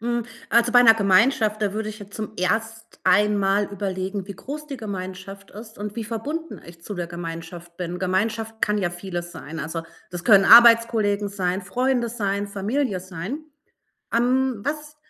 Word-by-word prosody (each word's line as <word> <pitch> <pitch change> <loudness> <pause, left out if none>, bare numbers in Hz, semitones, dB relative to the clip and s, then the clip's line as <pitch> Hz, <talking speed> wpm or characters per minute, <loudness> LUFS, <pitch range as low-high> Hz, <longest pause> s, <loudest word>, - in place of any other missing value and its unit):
Hm. 240 0 -1 0.3
Also, 235 +1 +3
bei 245 -1 +7
'ner 225 -2 +8
Gemeinschaft, 215 +1 +3
da 205 -2 0
würde 215 +1 -3
ich 215 0 -8
jetzt 205 -1 -12
zum 215 0 -5
erst 225 +4 -2
einmal 200 +1 +3
überlegen, 195 -1 -4
wie 200 - -7
groß 300 +7 -7
die 280 -2 -6
Gemeinschaft 195 -2 -7
ist 220 +1 -12
und 205 0 -5
wie 230 - -3
verbunden 290 +9 -5
ich 170 0 -14
zu 205 - -6
der 175 -2 -4
Gemeinschaft 170 0 -8
bin. 180 0 -4
Gemeinschaft 220 +4 -2
kann 210 0 +1
ja 180 -3 0
vieles 175 -1 -6
sein. 160 +3 -8
Also, 160 +2 -4 0.3
das 175 -1 -7
können 200 -4 +6
Arbeitskollegen 230 -3 +6
sein, 190 -1 -2
Freunde 250 +4 0
sein, 205 -3 -2
Familie 205 +1 -2
sein. 190 - -6 0.7
Ähm, 250 -1 +1
was 300 0 -4
205 Hz, 165 wpm, -23 LUFS, 185-230 Hz, 0.7 s, ner